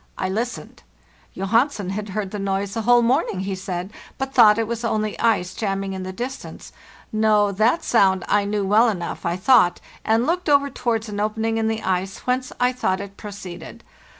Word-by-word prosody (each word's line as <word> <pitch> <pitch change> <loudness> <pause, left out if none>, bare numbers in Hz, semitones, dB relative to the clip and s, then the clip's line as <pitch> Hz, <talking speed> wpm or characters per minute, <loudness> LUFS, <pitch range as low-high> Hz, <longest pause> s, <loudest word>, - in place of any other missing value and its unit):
I 185 - -2
listened. 230 +6 -4 0.5
Johansen 210 0 0
had 210 +1 -4
heard 195 0 -3
the 210 - -5
noise 195 0 -2
the 225 - -2
whole 240 +2 +4
morning, 240 - +1
he 195 0 -3
said, 185 +1 -5 0.2
but 270 0 -4
thought 215 -3 +7
it 225 - +1
was 230 +1 -4
only 215 -2 -1
ice 205 -6 +1
Jamming 195 -2 -2
in 190 - -5
the 185 0 -5
distance. 250 +7 -7 0.4
No, 215 -1 +3
that 220 - +2
sound 190 -5 +3
I 205 0 +2
knew 205 -1 -1
well 215 +4 +4
enough, 175 -5 -4
I 170 - 0
thought, 185 -2 +4 0.2
and 225 +2 +2
looked 350 +1 -1
over 280 -1 +3
towards 230 -3 -1
an 205 -1 -5
opening 220 +2 -1
in 220 - 0
the 220 0 -2
ice 190 +1 -1
whence 255 0 -1
I 250 +1 +2
thought 190 -6 -1
it 200 0 -8
proceeded. 190 -5 -9
210 Hz, 190 wpm, -22 LUFS, 195-235 Hz, 0.5 s, thought